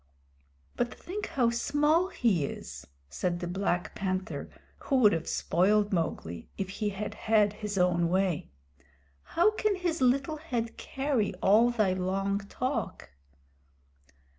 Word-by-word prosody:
"But 240 -1 0
think 410 +4 -6
how 240 -4 +1
small 295 +8 +2
he 220 - +1
is," - - -7 0.2
said 175 - -2
the 175 - -4
Black 180 0 -1
Panther, 185 -1 -3 0.3
who 275 - -1
would 220 -7 +6
have 165 -1 -2
spoiled 205 +4 +2
Mowgli 85 - -3
if 190 -1 -3
he 210 +2 -2
had 205 +1 -4
had 210 -2 +2
his 210 -1 -5
own 175 -2 +2
way. 185 -3 0 0.9
"How 355 +6 +6
can 430 -1 0
his 350 -4 -2
little 275 +4 +2
head 240 -7 -3
carry 265 -8 -1
all 210 +6 +4
thy 215 -6 +2
long 195 +2 -1
talk?" 220 - -4
210 Hz, 135 wpm, -29 LUFS, 185-260 Hz, 0.9 s, would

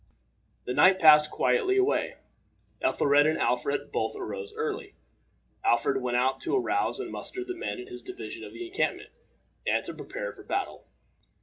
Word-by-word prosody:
The 125 - -2
night 185 +7 +6
passed 150 -3 +7
quietly 390 - +2
away. 390 +2 +1 0.7
Ethelred 145 +1 +4
and 155 - +1
Alfred 125 +4 0
both - - -1
arose 460 -3 -6
early. 445 -2 -4 0.7
Alfred 125 +3 +2
went 125 -1 0
out 130 +2 +1
to 335 - -1
arouse 380 - 0
and - - -5
muster 375 - -5
the 370 0 -5
men 360 - -4
in 370 - -7
his 370 -2 -9
division 375 0 -8
of - - -9
the 360 - -7
encampment, 375 +5 -2 0.6
and - - +1
to - - -5
prepare - - -6
for - - -14
battle. 395 - -3
360 Hz, 165 wpm, -28 LUFS, -, 0.7 s, passed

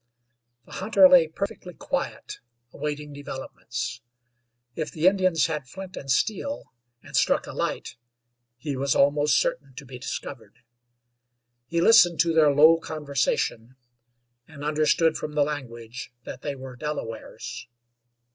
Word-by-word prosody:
The - - -18
hunter 195 -1 +5
lay 180 -3 +6
perfectly 180 +1 -6
quiet, - - -4 0.3
awaiting 150 0 -4
developments. 130 -4 -6 0.7
If 155 - -3
the 160 +1 -2
Indians 185 -5 +4
had 150 -5 -3
flint 190 +5 -9
and 135 - -8
steel, 220 - -1 0.3
and - - -9
struck - - +2
a - - -8
light, 120 - -3 0.6
he 140 +3 -4
was 135 0 0
almost 145 +1 +4
certain 135 -1 -2
to 140 +2 -9
be 125 -1 -10
discovered. 130 -1 -7 1.1
He 170 +3 0
listened 175 -5 +6
to 165 0 +1
their 155 -2 +5
low 155 +3 +6
conversation, 140 -6 -2 0.7
and 145 -3 -11
understood 155 +2 +2
from 150 - -5
the 150 -1 +3
language 120 -5 -6
that - - -8
they 145 -1 -3
were 130 -1 -9
Delawares. 125 -6 -6
150 Hz, 130 wpm, -25 LUFS, 135-165 Hz, 1.1 s, lay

